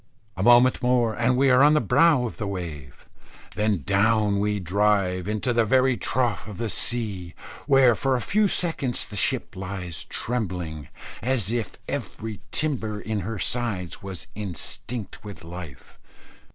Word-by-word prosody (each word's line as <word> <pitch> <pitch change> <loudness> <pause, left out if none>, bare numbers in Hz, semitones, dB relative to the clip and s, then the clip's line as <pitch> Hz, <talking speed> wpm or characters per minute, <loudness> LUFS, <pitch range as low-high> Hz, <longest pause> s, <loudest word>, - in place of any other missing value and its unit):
A 95 - -4
moment 120 +4 +5
more 125 -2 +2
and 120 +3 +1
we 135 0 +4
are 125 +1 +6
on 150 +2 +6
the - - +5
brow 150 -5 +4
of 115 - -6
the 105 - -3
wave, 80 -9 -7 0.5
then 105 -7 0
down 105 +1 +2
we 105 0 0
drive 95 0 +1
into 110 +4 -1
the 115 -1 +3
very 130 +3 +3
trough 120 -3 -1
of 105 -4 -8
the 115 +1 -2
sea, 100 -8 -1 0.3
where, 135 -4 +6
for 135 +4 0
a - - 0
few 210 - +2
seconds, 160 -9 -1
the 105 - -10
ship 100 - 0
lies 90 -3 -4
trembling, 90 - -3 0.3
as 120 -5 0
if 120 -2 -3
every 110 -5 -5
timber 115 -9 -1
in 110 0 -3
her 105 +4 -4
sides 100 -5 -2
was 95 -3 -6
instinct 105 +3 -6
with 105 -4 -9
life. 85 -4 -10
110 Hz, 155 wpm, -25 LUFS, 95-125 Hz, 0.5 s, are